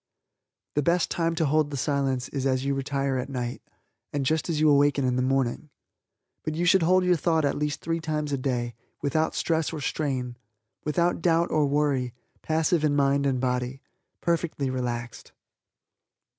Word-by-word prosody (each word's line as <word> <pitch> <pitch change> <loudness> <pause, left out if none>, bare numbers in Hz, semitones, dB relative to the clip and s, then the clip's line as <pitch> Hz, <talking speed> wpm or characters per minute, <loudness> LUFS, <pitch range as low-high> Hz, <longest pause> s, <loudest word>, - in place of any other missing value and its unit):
The 145 - +1
best 170 +4 +1
time 165 -1 0
to 160 - +1
hold 150 +1 +2
the 140 - -4
Silence 135 -1 0
is 135 -1 -1
as 130 0 0
you 140 - +1
retire 135 0 -1
at 125 - -4
night, 125 -2 -4 0.5
and 140 -2 -1
just 160 +4 0
as 160 -3 0
you 155 - +4
awaken 145 -1 +4
in 125 -1 +1
the 130 - +1
morning. 135 +2 0 0.7
But 155 - -3
you 175 +2 0
should 190 +1 +5
hold 185 +3 +4
your 180 0 +4
thought 160 -1 +1
at 140 - +1
least 150 -1 -2
three 165 +1 -1
times 155 -2 -2
a - - +1
day, 120 -3 -1 0.3
without 155 +3 +1
stress 160 -2 0
or 160 - -5
strain, 130 -4 -2 0.5
without 170 +3 +1
doubt 170 0 +2
or 155 -2 +3
worry, 140 -4 0 0.3
passive 160 +1 +1
in 145 -2 +2
mind 140 0 +2
and 130 -2 +1
body 125 +1 -2 0.4
perfectly 165 -5 0
relaxed. 120 -2 -4
145 Hz, 175 wpm, -26 LUFS, 130-160 Hz, 0.7 s, should